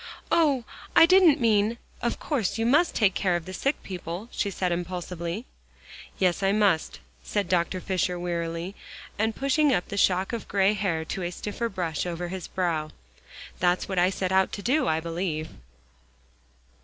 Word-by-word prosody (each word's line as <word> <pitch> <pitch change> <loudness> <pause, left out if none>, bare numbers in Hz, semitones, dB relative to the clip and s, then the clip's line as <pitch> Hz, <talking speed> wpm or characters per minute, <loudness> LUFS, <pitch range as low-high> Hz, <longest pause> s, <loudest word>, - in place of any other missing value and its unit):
"Oh! 290 -7 +3 0.3
I - - +9
didn't 360 -4 +6
mean 220 -1 +2 0.2
of 235 - -1
course 245 - -1
you 225 - 0
must 300 +8 +3
take 205 -4 +3
care 185 -2 +1
of 170 -2 -3
the 185 - -7
sick 275 +9 -1
people," 180 +3 -6
she 200 - -1
said 185 -2 -1
impulsively. 175 +3 -4 0.7
"Yes, 185 0 +1
I 195 0 +3
must," 200 - +1 0.2
said 205 -3 -1
Dr. 180 +1 +1
Fisher 180 -1 -1
wearily, 170 +1 -3 0.5
and 220 0 +1
pushing 280 +2 +2
up 180 -7 0
the 200 - -4
shock 190 +2 +2
of 230 - -4
gray 195 +1 +3
hair 175 -6 -1
to 190 - -4
a 175 - -2
stiffer 210 +5 -4
brush 175 -4 -2
over 175 0 -4
his 185 -1 -5
brow. 165 -4 -1 0.7
"That's 175 0 +1
what 190 -2 -1
I 180 +1 +4
set 190 -1 -2
out 190 0 +3
to 200 - -5
do, 280 +8 +2
I 160 0 +2
believe." 165 -1 -3
190 Hz, 170 wpm, -26 LUFS, 175-220 Hz, 0.7 s, I